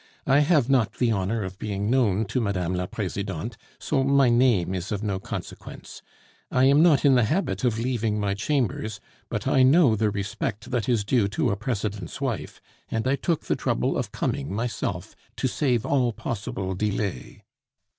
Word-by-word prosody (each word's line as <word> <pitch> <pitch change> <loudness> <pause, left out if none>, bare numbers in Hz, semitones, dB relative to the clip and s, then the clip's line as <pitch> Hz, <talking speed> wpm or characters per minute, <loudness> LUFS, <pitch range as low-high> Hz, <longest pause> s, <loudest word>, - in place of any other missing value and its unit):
I 135 +1 +4
have 150 -4 +3
not 130 -6 +2
the 120 -2 +1
honor 105 +2 -1
of 95 +1 -7
being 100 -1 -3
known 110 -5 +2
to 115 +5 -1
Mme. 95 -5 -1
la 90 0 -2
Presidente, 100 +1 -4 0.2
so 135 -3 0
my 140 -1 +4
name 120 -7 +3
is 90 0 -4
of 105 0 -2
no 100 -3 -1
consequence. - - -8 0.5
I 130 - +2
am 140 +3 +6
not 160 -4 +4
in 140 - +6
the 125 -3 +4
habit 170 - -1
of 120 -3 +1
leaving 115 -3 -1
my 100 -1 0
chambers, 110 -2 -1 0.3
but - - -3
I 130 - +4
know 135 -2 +5
the 110 0 +1
respect 100 +3 -4
that 120 -1 -1
is 115 -4 +2
due 110 -1 +2
to 115 +3 0
a - - 0
President's 105 -5 -4
wife, - - -3 0.3
and 115 +2 -1
I 135 - +3
took 165 +2 -1
the - - 0
trouble - - 0
of - - -2
coming 70 - -2
myself 115 +4 -3 0.2
to - - 0
save 125 -3 0
all 125 -4 +1
possible 100 - -4
delay." 100 - -3
110 Hz, 180 wpm, -25 LUFS, 100-130 Hz, 0.5 s, am